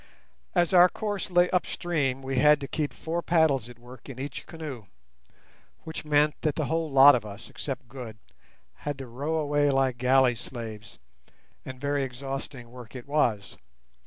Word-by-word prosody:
As 175 0 +2
our 180 0 +8
course 205 0 -4
lay 175 0 +4
upstream, 150 -7 -1
we 135 0 -3
had 150 0 +6
to 140 - -4
keep 150 +1 -2
four 165 +2 -3
paddles 155 -9 +2
at 120 - -12
work 125 +3 -14
in 130 - -8
each 140 +2 -6
canoe, 145 - -8 1.0
which 160 0 -6
meant 150 0 +3
that 155 -3 0
the 155 - -1
whole 165 +2 -1
lot 135 +1 +8
of 120 -4 0
us, 105 +2 -10
except 135 -2 -5
Good, 120 -4 -9 0.6
had 145 -1 -4
to 135 - -7
row 140 +7 -3
away 145 -2 +2
like 135 -2 +1
galley 130 0 +4
slaves; 110 -3 -8 0.7
and 130 -1 -8
very 145 0 0
exhausting 135 -1 -6
work 125 -1 -12
it 125 - -8
was. 120 -9 0
135 Hz, 165 wpm, -27 LUFS, 125-155 Hz, 1.0 s, our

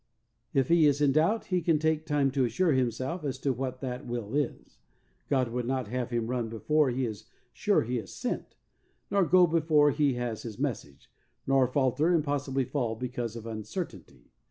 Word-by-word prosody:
If 135 -2 +1
he 165 -2 +6
is 145 -1 +2
in 145 -2 +4
doubt 165 +10 +2
he 180 - +3
can 160 -1 +3
take 160 +1 0
time 145 -3 +2
to 135 -1 +1
assure 140 +9 +1
himself 130 +6 -1
as 135 -3 -2
to 135 - +1
what 130 0 -4
that 125 0 -5
will 120 -2 -4
is. 145 -3 -3 0.5
God 130 -3 +2
would 120 0 -3
not 130 -4 -1
have 125 0 -2
him 120 -2 -1
run 120 -1 -2
before 150 +6 +1
he 130 +1 -1
is 110 -1 -6 0.3
sure 205 - +2
he 120 +1 -2
is 105 - -9
sent, - - -4 0.6
nor 200 -1 +4
go 180 +1 +6
before 155 -3 +3
he 145 -2 +1
has 120 -3 -3
his 110 -3 -7
message, 120 - -4 0.3
nor 135 -1 +3
falter 135 +4 +1
and 165 -3 +3
possibly 140 -2 -1
fall 120 -4 -2
because 120 -1 -4
of 115 -1 -8
uncertainty. 110 - -7
130 Hz, 190 wpm, -29 LUFS, 120-150 Hz, 0.6 s, he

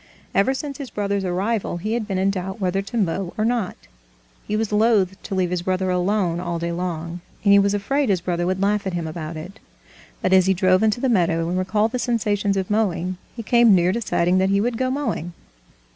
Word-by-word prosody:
Ever 230 +7 +2
since 280 0 -5
his 275 -3 -6
brother's 200 -1 -2
arrival, 190 +2 -1
he 210 +6 -3
had 235 -3 -2
been 195 -3 -2
in 195 +1 +2
doubt 190 +1 -5
whether 190 0 0
to 200 +5 -6
mow 190 -2 -1
or 215 - +1
not. 230 -5 -1 0.7
He 210 - -1
was 220 -1 -1
loath 210 -3 +3
to 195 - -5
leave 180 -2 0
his 180 -1 -1
brother 185 +1 0
alone 180 -1 0
all 175 -1 -3
day 170 +1 -2
long, 170 -1 -4 0.2
and 200 -1 +5
he 200 - +7
was 200 +1 +2
afraid 270 +6 0
his 190 -3 +2
brother 175 0 -2
would 185 +1 -1
laugh 200 0 +1
at 190 - -3
him 170 -2 -2
about 160 0 -5
it. 185 +7 -9 0.6
But 185 - +2
as 190 -1 +5
he 190 - +3
drove 185 0 +3
into 220 +1 +2
the 265 - +2
meadow, 170 -7 +2
and 180 - -1
recalled 210 +4 +1
the 250 - -2
sensations 205 -4 0
of 190 +1 -2
mowing, 185 -4 0 0.2
he 230 - -6
came 235 -2 +5
near 175 0 +3
deciding 185 -4 +1
that 190 0 +2
he 200 0 +3
would 235 +3 0
go 260 0 +1
mowing. 260 - -2
195 Hz, 225 wpm, -22 LUFS, 180-215 Hz, 0.7 s, he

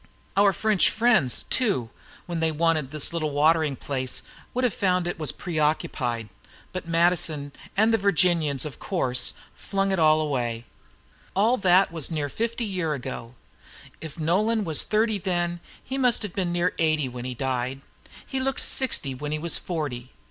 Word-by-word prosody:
Our 200 0 +5
French 210 +1 +3
friends, 220 - +2
too, 190 - +1 0.3
when 170 -1 -3
they 160 0 +1
wanted 155 -3 +1
this 150 +2 0
little 155 -2 -1
watering 150 0 +2
place, 130 -1 -3 0.3
would 255 - -2
have 245 - +2
found 180 -2 +1
it 175 -1 -4
was 155 - -1
preoccupied. 150 - -1 0.4
But 185 -2 -6
Madison 165 -4 +2 0.3
and 220 +2 +4
the 225 - +3
Virginians, 170 -8 +2
of 150 - -7
course, 125 -9 +1 0.2
flung 195 -1 -1
all 155 -1 +5
that 155 - 0
away. 120 -5 -2 0.7
All 220 +6 +4
that 185 -2 +4
was 165 -4 0
near 150 -3 -2
fifty 230 - -2
years 180 -7 -2
ago. 125 -2 -7 0.7
If 160 0 -8
Nolan 210 +8 +1
was 160 -5 +2
thirty 215 -1 +1
then, 175 -2 -1 0.2
he 265 +2 -4
must 250 -3 +3
have 205 -4 -5
been 185 -3 -1
near 175 +1 +1
eighty 155 -3 +2
when 125 -1 -7
he 125 -1 -4
died. 130 +1 -2 0.4
He 265 - -3
looked 270 +1 -1
sixty 225 - 0
when 145 +3 -5
he 155 - 0
was 165 +2 +2
forty. 140 -8 -4
165 Hz, 165 wpm, -25 LUFS, 145-195 Hz, 0.7 s, Our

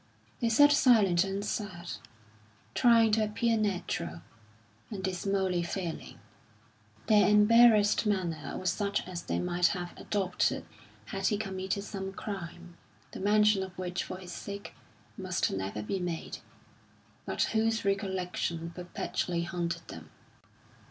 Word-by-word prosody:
They 235 - +1
sat 290 +6 +6
silent 210 -11 +5
and 195 +1 -3
sad, 185 -5 -4 0.8
trying 230 -2 +5
to 215 +1 +3
appear 225 +2 +1
natural, 175 - -2 0.7
and 195 -4 -6
dismally 190 -1 0
failing; 170 -1 -5 0.9
their 210 -3 +5
embarrassed 215 0 +6
manner 175 -7 -2
was 185 -2 0
such 200 +1 -2
as 180 -2 -5
they - - -2
might 180 0 +2
have 175 0 -6
adopted 190 -3 -1 0.4
had 195 0 -2
he 210 - +1
committed 195 -1 -3
some 195 -2 -5
crime, 175 -4 -7 0.3
the - - -8
mention 210 0 +4
of 190 -1 -7
which 180 -1 -3
for - - -6
his 185 -1 -10
sake 200 +2 -7 0.5
must 185 -1 0
never 95 +2 -3
be 190 - -2
made, 175 -2 -4 0.9
but - - 0
whose 225 0 +1
recollection 185 -4 -2
perpetually 175 0 -3
haunted 170 -1 -3
them. 80 -1 -10
190 Hz, 125 wpm, -30 LUFS, 175-210 Hz, 0.9 s, sat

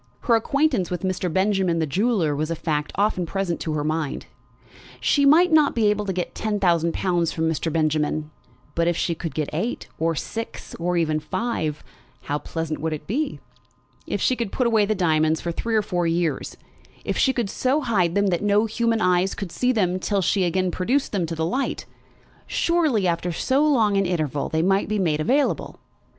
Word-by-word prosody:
Her 240 - +2
acquaintance 250 - +1
with 180 0 -4
Mr. 185 -2 -1
Benjamin, 190 -1 +1
the 160 - +1
jeweller, 180 - +1
was 155 +2 -2
a 165 - -1
fact 150 -2 -2
often 195 -3 +1
present 195 -2 -2
to 160 - -3
her 150 -1 -1
mind. 155 -1 -2 0.7
She 285 -1 +3
might 340 +5 +6
not 305 -2 +4
be 215 -3 +3
able 210 0 -2
to 195 - -1
get 180 -1 -3
ten 215 -1 -2
thousand 170 -3 +2
pounds 175 -3 0
from 160 0 -1
Mr. 160 0 -1
Benjamin; 155 -1 0 0.4
but 170 +1 +1
if 175 -1 +1
she 170 - 0
could 165 0 -6
get 155 -2 -2
eight, 200 +11 -3
or 165 +1 +1
six, 225 +9 -6
or 175 +1 0
even 155 -2 +1
five, 155 -2 -3 0.4
how 145 +1 -2
pleasant 160 -1 -4
would 160 0 -1
it 150 -1 -6
be! 280 - -2 0.7
If - - -2
she 255 - +2
could 235 -5 -3
put 255 - 0
away 220 -3 +3
the 215 - +1
diamonds 160 -3 +2
for 170 - -3
three 225 +6 -2
or 215 - +3
four 175 -3 -1
years, 165 -4 -1 0.5
if - - -1
she 265 - +3
could 240 -5 -1
so 260 +8 0
hide 190 - +1
them 200 0 +3
that 170 - 0
no 205 +1 +3
human 230 0 0
eyes 180 0 +2
could 195 -4 -6
see 250 +7 +1
them 185 -6 +1
till 195 +1 0
she 200 - +1
should 180 - +2
again 185 +1 0
produce 250 +12 0
them 185 -5 -1
to 165 - -4
the 160 0 -1
light, 255 +11 -2 0.6
surely, 310 - +1
after 175 +1 -1
so 265 - +1
long 225 -9 +3
an 195 -2 +2
interval, 155 -5 -1
they 160 0 0
might 195 +3 +2
be 215 - 0
made 160 -6 +1
available! 265 - 0
185 Hz, 205 wpm, -23 LUFS, 165-220 Hz, 0.7 s, might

